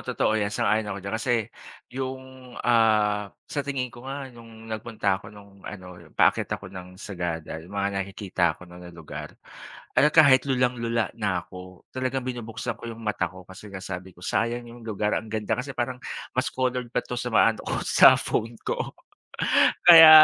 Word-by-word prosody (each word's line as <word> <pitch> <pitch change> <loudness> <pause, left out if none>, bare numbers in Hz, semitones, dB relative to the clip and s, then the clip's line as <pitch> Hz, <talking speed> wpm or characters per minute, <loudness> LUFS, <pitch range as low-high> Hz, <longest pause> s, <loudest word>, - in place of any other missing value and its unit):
totoo - - 0
yan 100 - +1
sang-ayon 105 +1 +1
ako 100 - -3
diyan. 100 - -3
Kasi 125 - 0 0.6
yung, 130 -1 -7
ah, 105 -3 +3 0.2
sa 145 - -3
tingin 135 -3 -3
ko 125 +2 -10
nga 135 -1 -6
nung 115 -1 -13
nagpunta 110 -3 -2
ako 100 - -11
nung 100 -2 -15
ano 90 -3 -9 0.2
paakyat - - +3
ako 95 -1 -12
ng 90 -1 -9
Sagada 85 -5 -4
mga 100 +3 -2
nakikita 95 -4 -1
ko 90 - -13
na 90 0 -13
ng 85 -1 -11
lugar 80 - -8 0.6
at 150 - +6
kahit 140 -4 +7
lulang-lula 120 -4 +1
na 100 -5 0
ako 90 -1 -12
talagang 130 0 -2
binubuksan 115 -3 -4
ko - - -7
yung 115 - -11
mata 95 -4 0
ko 95 +1 -12
kasi 95 +2 -11
nga 95 - -6
sabi 90 0 -7
ko 90 - -17
sayang 120 +4 0
yung 120 0 -12
lugar 105 -1 -1
ang 110 - -9
ganda 110 -1 -2
kasi 140 +2 -4
parang 125 +1 -2 0.4
mas 125 - +2
colored 125 -1 -1
pa - - +1
to 125 - -5
sa 125 - -3
mga - - +6
ano - - -9
ko - - 0
sa - - +7
phone 115 +1 -2
ko. - - -3 0.9
Kaya 165 -2 +12
110 Hz, 180 wpm, -26 LUFS, 95-125 Hz, 0.9 s, Kaya